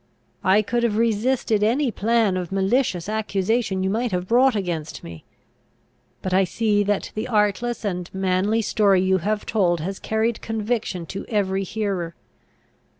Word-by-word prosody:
I 200 +3 +4
could 240 +3 -1
have 225 -3 +1
resisted 230 0 +1
any 245 +5 +2
plan 220 -1 +1
of 180 -1 -4
malicious 195 -2 +1
accusation 215 -1 0
you 190 - +1
might 235 +2 -1
have 180 0 -2
brought 250 +2 +4
against 170 -6 -3
me. 85 -1 -10 1.0
But 185 - -2
I 190 +1 +5
see 210 +2 +1
that 205 0 -1
the 215 +3 -3
artless 220 +1 0
and 180 -3 -3
manly 190 +4 +1
story 200 -3 +3
you 190 0 +2
have 210 +4 -2
told, 180 -6 +1
has 190 +4 -4
carried 220 +1 -1
conviction 220 -5 -2
to 195 +4 -6
every 195 -3 0
hearer. 190 -4 -3
205 Hz, 150 wpm, -23 LUFS, 190-225 Hz, 1.0 s, I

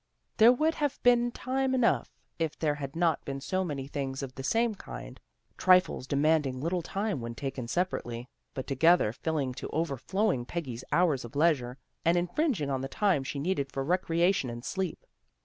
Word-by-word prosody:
There 225 +2 +8
would 310 +6 +2
have 290 -4 -1
been 240 0 +5
time 260 +2 -1
enough 250 -2 +2 0.3
if 160 -2 -1
there 155 -2 +1
had 140 -1 -6
not 165 -1 +1
been 135 0 -4
so 185 +7 -1
many 145 -6 -4
things 135 -1 -4
of 130 -1 -6
the 135 - -7
same 230 - +1
kind; - - -9 0.4
trifles 185 -7 +4
demanding 145 -2 +2
little 170 +5 -1
tune 200 0 -2
when 115 0 -5
taken 135 -3 -4
separately, 120 -7 -2 0.3
but 130 - -4
together 145 -3 +4
filling 145 -3 -2
to - - -6
overflowing 165 - 0
Peggy's 130 -7 -5
hours 165 -7 +2
of 120 - -10
leisure, 140 -5 +2 0.3
and 170 +1 +3
infringing 175 - 0
on 135 -1 -1
the 135 - -3
time 185 -5 +1
she 135 - -5
needed 140 -2 -1
for 135 - -2
recreation 175 -1 +1
and 120 +1 -7
sleep. 190 - -3
160 Hz, 175 wpm, -29 LUFS, 135-185 Hz, 0.4 s, There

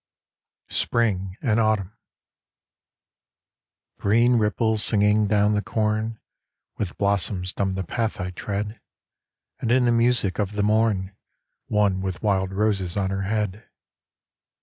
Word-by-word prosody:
SPRING 95 -5 0
AND 115 -4 +2
AUTUMN 110 -4 +1 2.1
Green 115 +4 +3
ripples 110 0 +1
singing 105 0 +3
down 105 0 +3
the 105 - +1
corn, 110 +1 -1 0.6
With 100 -5 -3
blossoms 100 -2 -1
dumb 95 -1 -1
the 95 - -2
path 110 +5 -2
I 90 -1 -3
tread, 105 +4 -4 0.8
And 115 - -1
in 125 0 +4
the 120 - +3
music 115 -5 +2
of 105 -1 -1
the 105 0 0
mom 105 -3 +1 0.6
One 100 -3 +1
with 95 0 -4
wild 95 -2 +1
roses 95 -3 0
on 95 -1 0
her 95 0 -2
head. 105 -1 -2
105 Hz, 125 wpm, -24 LUFS, 95-110 Hz, 2.1 s, in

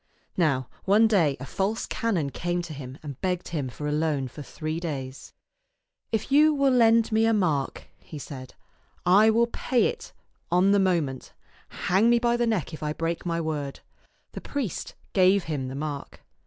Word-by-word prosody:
Now 140 -8 +1 0.2
one 210 +3 +5
day 170 -10 +2
a 130 - -6
false 200 +8 -2
canon 175 -12 -1
came 175 +3 -2
to 160 - -7
him 135 -2 -8
and 140 -4 -8
begged 180 -1 -2
him 145 -6 -3
for 150 +4 -7
a - - -1
loan 150 -3 0
for 150 - -10
three 155 +2 -4
days. 135 -6 -6 0.4
" - - -55
If 220 +3 -2
you 300 +2 +5
will 275 -1 +3
lend 230 -2 +4
me 220 +1 +3
a 225 - +3
mark," 155 -9 0 0.2
he 155 - -10
said, 130 -3 -9 0.3
" - - -37 0.2
I 220 - +6
will 230 +2 +4
pay 240 +1 0
it 475 -1 -3 0.4
on 180 +3 +4
the 200 - +4
mo 185 -3 +3
ment. 135 -3 -7 0.5
Hang 195 +6 +4
me 240 - +5
by 235 0 +2
the 240 0 +1
neck 190 -9 -1
if 155 - -8
I 150 0 -2
break 165 +2 -3
my 170 -1 0
word." 150 -4 -4 0.5
The - - -7
priest 265 - -4 0.2
gave 190 0 +4
him 145 -5 -3
the 130 - -6
mark. 145 -1 -6
170 Hz, 195 wpm, -26 LUFS, 145-220 Hz, 0.5 s, I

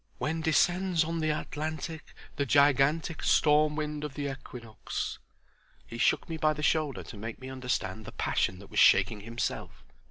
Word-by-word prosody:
"'When 160 +2 -2
descends 175 +2 +2
on 165 +1 -3
the 155 -1 0
Atlantic 155 +1 -4 0.2
The 140 - 0
gigantic 145 +4 +3
Storm 150 0 +4
wind 150 -1 -3
of 150 -3 -5
the 145 -1 -3
Equinox.'" 120 -4 -6 0.7
He 115 - -8
shook - - +2
me 165 - -4
by 155 0 +2
the 150 0 -6
shoulder 150 -4 +1
to 115 - -10
make 110 +2 -6
me 130 0 -8
understand 125 -4 -3
the - - -8
passion 90 - 0
that 100 +1 -14
was - - 0
shaking 95 +2 +5
himself. 115 +3 -4
150 Hz, 165 wpm, -29 LUFS, 125-155 Hz, 0.7 s, shaking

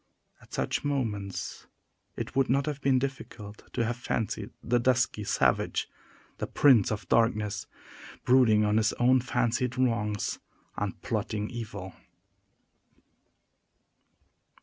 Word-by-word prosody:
At - - -20
such - - -1
moments 110 -9 -3 0.5
it - - -5
would 135 -2 +2
not 135 +2 +2
have 150 -2 -4
been 135 -1 +3
difficult 120 -6 -6
to 115 - 0
have 120 +1 -2
fancied 110 -3 -2
the 120 +1 +2
dusky 125 -3 +1
savage - - +1 0.5
the - - -2
Prince 125 -9 +5
of 105 - -4
Darkness 110 -3 +1 0.6
brooding 115 -5 +5
on 105 +1 +2
his 110 -1 +2
own 130 +2 +4
fancied 125 0 0
wrongs, 105 -5 0 0.4
and - - -3
plotting 105 -1 -2
evil. 105 -6 -6
115 Hz, 115 wpm, -28 LUFS, 105-130 Hz, 0.6 s, Prince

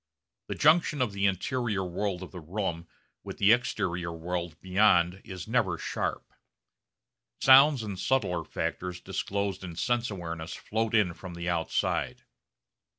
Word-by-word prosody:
The - - -3
junction 155 -1 +4
of 125 -5 0
the 100 0 +2
interior 105 +1 -1
world 95 +1 -3
of 90 - -10
the 90 - -8
room 85 0 -4 0.4
with - - -7
the 100 +2 +5
exterior 90 -7 0
world 85 0 -4
beyond 95 -1 +3
is 95 -5 -8
never - - +1
sharp. - - -4 1.1
Sounds 135 -1 +7
and 100 -4 -5
subtler 100 -11 0
factors 90 +2 -4
disclosed 100 +1 -3
in 85 -3 -7
sense 120 +4 0
awareness 85 -4 -5
float 110 +1 -2
in 100 -5 +3
from 90 +1 -9
the 85 0 -5
outside. 85 -2 -1
95 Hz, 140 wpm, -28 LUFS, 85-110 Hz, 1.1 s, Sounds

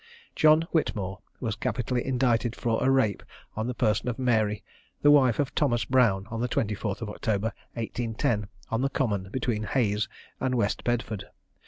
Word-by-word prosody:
John 155 +1 +5
Whitmore 100 - -1 0.2
was 110 -3 -2
capitally 120 +2 -1
indicted 125 -3 +1
for 115 -1 0
a 130 - +3
rape 130 -7 +2 0.3
on 110 +2 -2
the 125 - -3
person 110 -1 +1
of 120 - -3
Mary, 110 -5 +1 0.4
the 145 - +7
wife 130 -5 +5
of 145 -2 -1
Thomas 120 -6 +1
Brown, 115 -7 +3
on 115 0 -3
the 125 - 0
24th 105 -3 -1
of 110 - -4
October, 110 +1 -1 0.2
1810, 115 -2 -1 0.2
on 115 +1 +1
the 135 - +1
Common 100 -9 -1
between 120 -2 -1
Hayes 110 -1 0 0.3
and 130 -1 0
West 110 -4 0
Bedford. 115 -4 -1
115 Hz, 165 wpm, -27 LUFS, 105-125 Hz, 0.4 s, the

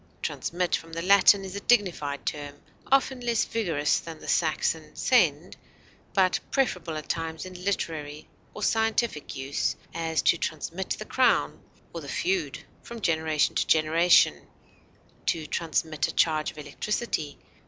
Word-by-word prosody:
Transmit, 175 0 -1
from 165 0 -8
the 165 +1 -3
Latin, 200 +1 +6
is 190 0 -7
a - - -3
dignified 180 - +1
term, 145 -1 -4 0.4
often 270 -1 +3
less 235 -2 +1
vigorous 165 -10 0
than 165 -1 -9
the - - -11
Saxon 480 0 0
send, - - +2 0.6
but 185 -2 +3
preferable 180 - -1
at 155 - -7
times 160 -1 -3
in 185 - -9
literary 155 -6 -3 0.3
or 210 - -5
scientific 225 -7 0
use; 135 +1 -1 0.2
as, 165 -1 -1
to 170 - +3
transmit 170 +3 -4
the - - -3
crown, - - +2 0.3
or - - -5
the - - -9
feud, 370 +1 -1 0.2
from 235 0 -9
generation 160 -5 +1
to - - 0
generation; 160 +2 +4 0.8
to 160 -2 0
transmit 160 -1 -1
a - - -4
charge 155 -2 +2
of - - -12
electricity. 155 0 -3
165 Hz, 145 wpm, -27 LUFS, 155-200 Hz, 0.8 s, Latin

